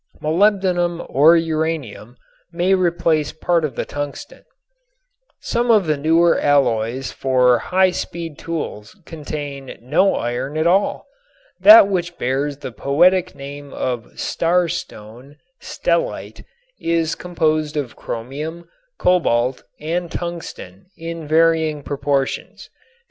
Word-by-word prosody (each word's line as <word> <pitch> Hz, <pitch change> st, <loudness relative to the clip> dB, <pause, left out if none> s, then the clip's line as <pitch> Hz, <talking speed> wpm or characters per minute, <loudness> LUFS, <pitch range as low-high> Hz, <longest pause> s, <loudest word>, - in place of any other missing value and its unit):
Molybdenum 175 Hz, 0 st, +1 dB
or 155 Hz, +5 st, +6 dB
uranium 155 Hz, -8 st, -3 dB, 0.3 s
may 180 Hz, +2 st, +1 dB
replace 170 Hz, -4 st, +1 dB
part 170 Hz, 0 st, 0 dB
of 140 Hz, -6 st, -3 dB
the -, -, -3 dB
tungsten. 145 Hz, -1 st, -7 dB, 1.0 s
Some 240 Hz, +1 st, -1 dB
of 215 Hz, -5 st, +5 dB
the 155 Hz, -1 st, +1 dB
newer 165 Hz, +4 st, +3 dB
alloys 130 Hz, -3 st, +1 dB
for 125 Hz, -2 st, +2 dB
high 185 Hz, 0 st, +2 dB
speed 165 Hz, -3 st, -6 dB
tools 150 Hz, -10 st, -6 dB
contain 145 Hz, -4 st, -7 dB
no 160 Hz, +11 st, +2 dB
iron 125 Hz, +5 st, -3 dB
at 155 Hz, -, 0 dB
all. 190 Hz, +4 st, +1 dB, 0.5 s
That 320 Hz, -9 st, +9 dB
which 175 Hz, -3 st, -2 dB
bears 135 Hz, +3 st, -1 dB
the 130 Hz, -, -7 dB
poetic 175 Hz, +9 st, +2 dB
name 140 Hz, +1 st, -9 dB
of 120 Hz, -3 st, -4 dB
star 175 Hz, +1 st, +1 dB
stone, 125 Hz, -3 st, -8 dB, 0.2 s
stellite, -, -, -2 dB, 0.3 s
is 165 Hz, -1 st, 0 dB
composed 155 Hz, -3 st, -1 dB
of 135 Hz, -5 st, -4 dB
chromium, 150 Hz, +9 st, -6 dB, 0.3 s
cobalt 130 Hz, -8 st, +1 dB, 0.2 s
and 170 Hz, +3 st, -3 dB
tungsten 170 Hz, -, -7 dB
in 165 Hz, -1 st, -7 dB
varying 160 Hz, -1 st, +2 dB
proportions. 140 Hz, -1 st, -3 dB
155 Hz, 110 wpm, -20 LUFS, 135-170 Hz, 1.0 s, That